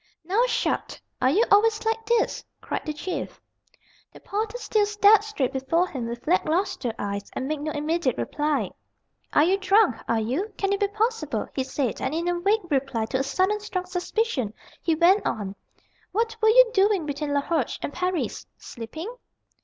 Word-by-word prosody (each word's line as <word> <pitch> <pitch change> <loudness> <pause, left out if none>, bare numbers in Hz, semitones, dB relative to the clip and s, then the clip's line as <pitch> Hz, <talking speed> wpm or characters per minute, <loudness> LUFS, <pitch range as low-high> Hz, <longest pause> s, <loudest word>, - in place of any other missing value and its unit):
"Now. 400 +7 +2
Sharp! 475 0 -1 0.3
Are 255 - +4
you 400 - +4
always 430 +2 +4
like 450 0 0
this?" 470 -1 +1 0.2
cried - - -4
the 305 - -1
Chief. 350 +5 -5 0.7
The - - -13
porter 435 +3 -3
still 425 -3 +1
stared 415 0 +5
straight 300 -12 -2
before 270 +7 +1
him 245 -4 -4
with 235 +1 -6
lack 355 +4 +3
lustre 330 - 0
eyes, 200 0 -4
and 260 - -3
made 305 0 -2
no 310 +1 -2
immediate 300 -3 0
reply. 300 0 -1 0.6
"Are 295 - +6
you 380 +4 +2
drunk? 390 - +4
are 230 - +2
you 265 - -2
Can 395 0 0
it 400 - -1
be 405 - +2
possible?" 415 - -1
he 265 - -1
said, 260 -2 -2
and 265 +4 -1
in 335 +1 -1 0.2
vague 400 -2 +1
reply 265 -5 0
to 260 - +1
a - - +1
sudden 380 +8 +1
strong 375 -3 -4
suspicion, 360 - -1 0.3
he 330 - +1
went 355 +6 +4
on: 200 -3 -2 0.6
"What 450 +2 0
were 440 - +5
you - - +7
doing 390 -4 +3
between 285 0 -2
Laroche 285 -1 0
and 285 - -3
Paris? 360 -1 -2
Sleeping?" 315 - -7
350 Hz, 175 wpm, -25 LUFS, 275-420 Hz, 0.7 s, you